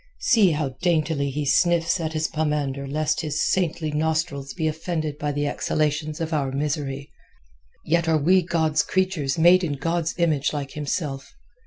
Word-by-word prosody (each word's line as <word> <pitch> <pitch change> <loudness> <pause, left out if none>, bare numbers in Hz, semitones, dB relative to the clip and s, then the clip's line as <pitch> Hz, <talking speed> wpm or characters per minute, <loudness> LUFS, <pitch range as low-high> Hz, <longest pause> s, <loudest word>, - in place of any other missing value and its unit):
See 220 -6 +4
how 150 -2 -1
daintily 155 -5 +1
he 145 +2 -3
sniffs 170 +4 +2
at 160 -1 -3
his 155 0 0
pomander 145 -3 -2
lest 155 +2 0
his 155 -3 -3
saintly 165 -4 0
nostrils 155 -2 -1
be 160 -3 -1
offended 155 -1 -3
by 145 0 -1
the 145 0 -1
exhalations 150 +1 -1
of 165 0 -3
our 140 -3 0
misery. 140 -1 -3 0.7
Yet 170 +1 +1
are 160 -1 +3
we 180 +6 +4
God's 160 -3 +1
creatures 185 -7 -1
made 175 +3 +6
in 155 -4 -1
God's 165 +3 -2
image 155 -5 +1
like 140 -2 -4
himself. 140 -2 -4
155 Hz, 160 wpm, -24 LUFS, 145-165 Hz, 0.7 s, made